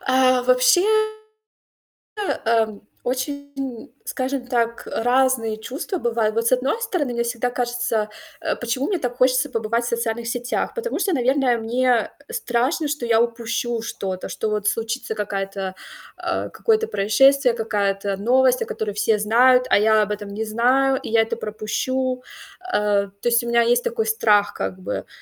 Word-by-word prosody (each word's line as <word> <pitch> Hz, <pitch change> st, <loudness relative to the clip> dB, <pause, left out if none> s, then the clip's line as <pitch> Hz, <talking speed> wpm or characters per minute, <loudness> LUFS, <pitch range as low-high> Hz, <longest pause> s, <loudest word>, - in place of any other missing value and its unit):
А, 255 Hz, -1 st, +3 dB
вообще, 370 Hz, -, +3 dB, 1.0 s
а, 230 Hz, -, +1 dB
ам, 215 Hz, -2 st, -6 dB, 0.2 s
очень, 285 Hz, +3 st, -3 dB
м, 260 Hz, -4 st, -5 dB, 0.2 s
скажем 260 Hz, -1 st, -3 dB
так, 235 Hz, -2 st, -1 dB
э, -, -, -3 dB
разные 245 Hz, -3 st, +2 dB
чувства 270 Hz, -, -5 dB
бывают. 230 Hz, -5 st, 0 dB
Вот 230 Hz, +1 st, 0 dB
с -, -, -1 dB
одной 255 Hz, -, +2 dB
стороны, 335 Hz, -, -1 dB
мне 235 Hz, -, 0 dB
всегда 235 Hz, +1 st, -1 dB
кажется, 240 Hz, -3 st, -1 dB, 0.3 s
э, -, -, -1 dB
почему 245 Hz, +3 st, -2 dB
мне 385 Hz, -, 0 dB
так 245 Hz, -5 st, -3 dB
хочется 255 Hz, +2 st, +3 dB
побывать 230 Hz, -1 st, -1 dB
в -, -, -2 dB
социальных 235 Hz, 0 st, -2 dB
сетях? 245 Hz, +1 st, -2 dB
Потому 480 Hz, 0 st, -3 dB
что, 385 Hz, -, +1 dB
наверное, 260 Hz, -1 st, +2 dB
мне 240 Hz, +1 st, +1 dB, 0.2 s
страшно, 300 Hz, -, 0 dB
что 290 Hz, -5 st, -3 dB
я 225 Hz, 0 st, +4 dB
упущу 235 Hz, 0 st, -2 dB
что-то, 190 Hz, -4 st, -5 dB
что 220 Hz, -, -3 dB
вот 210 Hz, -1 st, -2 dB
случится 225 Hz, +1 st, -2 dB
какая-то 195 Hz, -2 st, -3 dB, 0.4 s
а, -, -, -3 dB
какое-то 450 Hz, 0 st, +1 dB
происшествие, 250 Hz, +6 st, +4 dB
какая-то 200 Hz, -3 st, -1 dB
новость, 255 Hz, +4 st, +3 dB
о -, -, -2 dB
которой 215 Hz, -1 st, -3 dB
все 215 Hz, +1 st, +2 dB
знают, 250 Hz, +4 st, +4 dB
а -, -, +6 dB
я 215 Hz, +1 st, +4 dB
об 210 Hz, -, -2 dB
этом 205 Hz, -1 st, -5 dB
не 210 Hz, +2 st, -4 dB
знаю 255 Hz, +5 st, +2 dB
и -, -, -6 dB
я 225 Hz, 0 st, +4 dB
это 225 Hz, +1 st, -3 dB
пропущу. 255 Hz, +4 st, -2 dB, 0.4 s
А, 210 Hz, -, +1 dB
то 200 Hz, +4 st, -4 dB
есть 235 Hz, 0 st, +3 dB
у -, -, -4 dB
меня 235 Hz, 0 st, +4 dB
есть 240 Hz, -, +2 dB
такой 470 Hz, -2 st, -1 dB
страх 210 Hz, -, +3 dB
как 95 Hz, -1 st, -4 dB
бы. 100 Hz, +2 st, -4 dB
240 Hz, 165 wpm, -22 LUFS, 220-260 Hz, 1.0 s, а